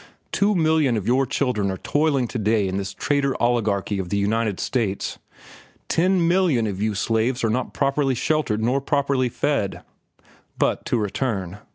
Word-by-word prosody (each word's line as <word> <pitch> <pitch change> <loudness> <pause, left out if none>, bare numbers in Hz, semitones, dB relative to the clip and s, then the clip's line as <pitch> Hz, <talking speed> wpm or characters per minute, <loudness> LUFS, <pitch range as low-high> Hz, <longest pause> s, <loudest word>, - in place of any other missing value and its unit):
Two 205 +1 +2
million 155 -7 +2
of 100 - -4
your 130 +3 +2
children 125 -7 0
are 95 - -3
toiling 145 -2 +1
to 120 - -3
day 105 -1 +2
in 95 +1 -2
this 100 0 -3
trader 140 -2 0
oligarchy 105 -4 0
of 90 -2 -4
the 100 - 0
United 105 0 0
States. 110 -7 -2 0.7
Ten 180 0 +2
millions 170 -11 +2
of 95 -1 -5
you 110 -1 0
slaves 115 +5 0
are 115 - +2
not 125 +2 -2
properly 140 -1 +1
sheltered 120 -6 0
nor 130 +4 +1
properly 140 -2 +1
fed. 130 -6 -1 0.7
"But - - 0
to - - 0
return. 105 -3 -2
120 Hz, 165 wpm, -23 LUFS, 105-140 Hz, 0.7 s, Two